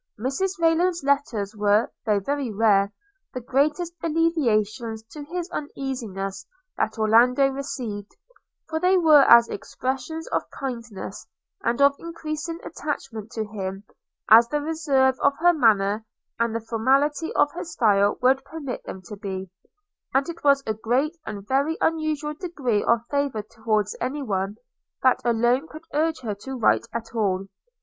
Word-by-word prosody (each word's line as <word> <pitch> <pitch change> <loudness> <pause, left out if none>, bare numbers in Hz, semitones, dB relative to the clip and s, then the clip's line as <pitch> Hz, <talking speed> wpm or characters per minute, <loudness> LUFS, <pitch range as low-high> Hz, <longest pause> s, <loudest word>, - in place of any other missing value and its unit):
Mrs 360 - -1
Rayland's 335 0 +2
letters 245 -8 0
were, 210 +1 +2 0.2
though 210 -2 +3
very 275 +3 -2
rare, 200 -2 +3 0.4
the - - -1
greatest 295 +7 0
alleviations 235 -9 0
to 300 - -8
his 350 +2 -4
uneasiness 240 -10 -4 0.3
that 220 - -1
Orlando 240 +5 +4
received; 245 -7 -5 0.6
for 320 - -2
they 365 +2 +4
were 310 -4 +7
as 235 -3 +7
expressive 265 +9 -4
of - - -1
kindness, 235 -6 -6 0.4
and 235 +2 0
of 280 0 +6
increasing 330 0 -5
attachment 245 -9 -5
to 220 -1 -2
him, 195 -2 -5 0.4
as 230 +2 +8
the 295 +4 -1
reserve 290 -4 +1
of 280 0 +3
her 350 +2 +5
manner, 215 -6 +3 0.4
and 230 -1 0
the 230 - -1
formality 275 +8 +1
of 290 - +3
her 340 - -5
style, 210 - +2
would 265 +1 +4
permit 275 -3 -6
them 185 - -8
to 210 - -8
be; 190 -2 -6 0.6
and 270 +1 +3
it 335 - -8
was 280 -1 +4
a 220 - 0
great 250 +9 0
and 200 -1 -6
very 280 +5 +1
unusual 310 -2 0
degree 295 - -1
of 235 0 +2
favour 280 -7 0
towards 215 -1 -1
any 275 +4 -2
one, 195 -3 -2 0.5
that 255 -1 +4
alone 240 +5 +2
could 310 +1 -11
urge 315 -1 0
her 220 -4 -3
to 260 +6 -7
write 230 0 +2
at 230 0 -6
all. 195 -4 0
255 Hz, 150 wpm, -24 LUFS, 215-300 Hz, 0.6 s, as